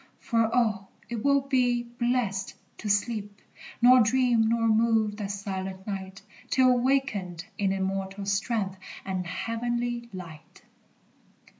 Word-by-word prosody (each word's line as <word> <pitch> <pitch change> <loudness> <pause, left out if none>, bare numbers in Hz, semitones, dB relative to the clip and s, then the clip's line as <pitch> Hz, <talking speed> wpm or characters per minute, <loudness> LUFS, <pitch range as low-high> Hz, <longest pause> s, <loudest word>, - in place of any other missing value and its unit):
For, 230 -2 +1
oh, 215 -5 +1 0.2
it 235 -2 -4
will 280 0 +4
be 250 -3 +1
blest 240 -5 -1 0.2
to 215 - -4
sleep, 205 0 -1 0.4
Nor 250 +1 +8
dream, 235 -1 +3
nor 230 0 +2
move, 220 -1 +2
that 205 -2 -4
silent 190 -1 -5
night, 195 -1 -6 0.3
Till 255 -1 +4
wakened 215 -10 0
in 195 -1 +2
immortal 195 +1 -2
strength 200 -1 -1 0.3
And 185 -2 -3
heavenly 235 +5 -2
light! 165 -4 -11
215 Hz, 120 wpm, -27 LUFS, 195-240 Hz, 0.4 s, Nor